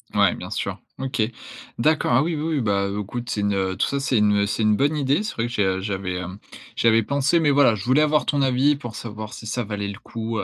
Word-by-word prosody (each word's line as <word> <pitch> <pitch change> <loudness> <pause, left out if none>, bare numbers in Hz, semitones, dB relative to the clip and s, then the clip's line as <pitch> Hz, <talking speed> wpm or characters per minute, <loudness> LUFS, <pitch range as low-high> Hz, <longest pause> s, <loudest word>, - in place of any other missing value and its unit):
Ouais, - - +4
bien - - -8
sûr. - - -4 0.2
OK. 130 -3 -2 0.6
D'accord. 155 +4 +2
Ah 130 +5 +4
oui, 165 +1 -1
oui, 150 - -3
oui! 140 - +1
Bah, 100 -3 +1
heu, 100 +1 -3
écoute, 120 +4 -6
c'est 105 - -1
une, 100 0 +1
heu, 95 -1 -1
tout - - +2
ça, 140 - -1
c'est 135 -3 +1
une, 105 -1 +4
heu, 100 - +2
c'est 105 +2 -1
une 105 -1 +4
bonne 145 +7 +1
idée, 140 +4 +1
c'est 215 - -4
vrai 115 - -1
que 120 - -5
j'ai, 105 - +1
heu, 95 0 0
j'avais, 95 -2 -3
hem, 90 +2 -6 0.4
j'avais 115 -1 +4
pensé, 140 +7 +2
mais 155 -3 +3
voilà, 140 -5 +5
je 100 0 -7
voulais 130 +4 +4
avoir 150 0 +2
ton 145 -1 +1
avis 135 +2 +3
pour 120 -6 -8
savoir 110 -1 -7
si - - -9
ça 120 +3 -2
valait 105 -1 -4
le 100 +2 -7
coup, 115 -1 -4
heu, - - -1
115 Hz, 275 wpm, -23 LUFS, 100-140 Hz, 0.6 s, voilà